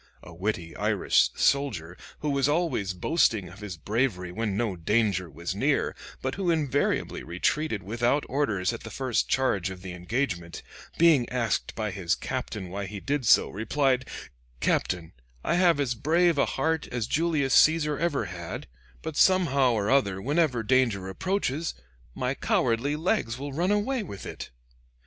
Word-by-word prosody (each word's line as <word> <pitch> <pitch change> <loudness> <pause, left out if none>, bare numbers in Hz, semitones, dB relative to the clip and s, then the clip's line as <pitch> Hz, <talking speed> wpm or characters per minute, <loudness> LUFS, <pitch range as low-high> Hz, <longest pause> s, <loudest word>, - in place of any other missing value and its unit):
A 90 - -11
witty 90 -2 -3
Irish - - +3
soldier 105 - +1 0.3
who 150 - 0
was 140 0 +2
always 145 - 0
boasting 110 - +1
of 95 +3 -13
his 105 -4 -7
bravery 100 -3 -1
when 105 +1 -2
no 110 -5 0
danger 95 0 +1
was 85 +5 -5
near, 135 +8 +1 0.3
but 130 0 -1
who 190 -3 -1
invariably 145 -4 0
retreated 105 - -1
without 120 +8 +1
orders 115 -8 0
at 115 - -6
the - - -8
first 130 -4 -1
charge 100 -8 +1
of 95 -1 -9
the 95 -2 -6
engagement, 90 -2 -3 0.3
being 160 -8 +5
asked 120 -4 -1
by 110 -2 -2
his 90 -3 0
captain 95 -4 -4
why 100 +1 -4
he 100 +1 -6
did 140 +1 -2
so, - - +6
replied, 130 +4 0 0.5
'Captain, 85 +4 0 0.3
I - - +1
have 175 -4 +4
as 135 -3 +1
brave 165 +6 +2
a - - +3
heart 160 -1 -1
as 120 -3 -2
Julius 150 -1 +1
Caesar 150 -2 +4
ever 155 -9 0
had, 90 -2 -6 0.4
but 160 -1 -5
somehow 140 -10 +4
or 105 0 0
other 100 -9 +2
whenever 140 - +1
danger 115 -6 +2
approaches, 165 - -2 0.4
my - - -1
cowardly 120 +6 +1
legs 155 - 0
will 140 +1 -6
run 175 +6 0
away 220 +5 +1
with 100 - -8
it.' - - -7
125 Hz, 160 wpm, -27 LUFS, 100-150 Hz, 0.5 s, so